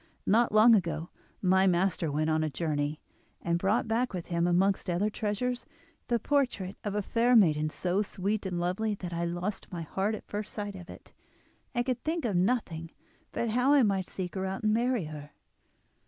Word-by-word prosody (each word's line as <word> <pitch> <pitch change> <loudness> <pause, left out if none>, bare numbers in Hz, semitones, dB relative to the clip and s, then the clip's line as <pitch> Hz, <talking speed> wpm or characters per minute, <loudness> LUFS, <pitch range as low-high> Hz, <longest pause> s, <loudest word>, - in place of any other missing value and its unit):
Not 230 +4 +3
long 215 +2 +7
ago 170 -5 0 0.3
my 190 +1 +4
master 175 -3 +1
went 155 +2 0
on 155 0 +2
a 155 - 0
journey, 150 -1 -2 0.4
and 170 0 0
brought 205 +6 +1
back 235 +2 0
with 180 -2 -4
him, 170 0 +1
amongst 190 +2 +2
other 190 +5 +1
treasures, 230 +4 -2 0.4
the 240 - +2
portrait 240 -7 0
of 205 -1 -3
a 210 - 0
fair 240 +4 +2
maiden 155 -8 +4
so 180 +5 0
sweet 200 0 -2
and 180 -2 -2
lovely 195 +5 -1
that 180 -3 -6
I 170 0 -1
lost 175 +4 -4
my 170 -2 -4
heart 195 +7 -1
at - - -10
first 210 0 -5
sight 205 -2 -4
of 180 -1 -10
it, - - -13 0.6
and 240 0 +1
could 255 -2 -2
think 320 -2 -1
of 210 -5 0
nothing 175 -5 0 0.4
but 235 -2 -1
how 250 +5 +3
I 285 -3 +6
might 195 -3 +1
seek 180 -2 -5
her 190 -1 -2
out 190 +2 -4
and 215 0 +3
marry 240 -4 +1
her. 150 -1 -9
195 Hz, 195 wpm, -29 LUFS, 175-220 Hz, 0.6 s, long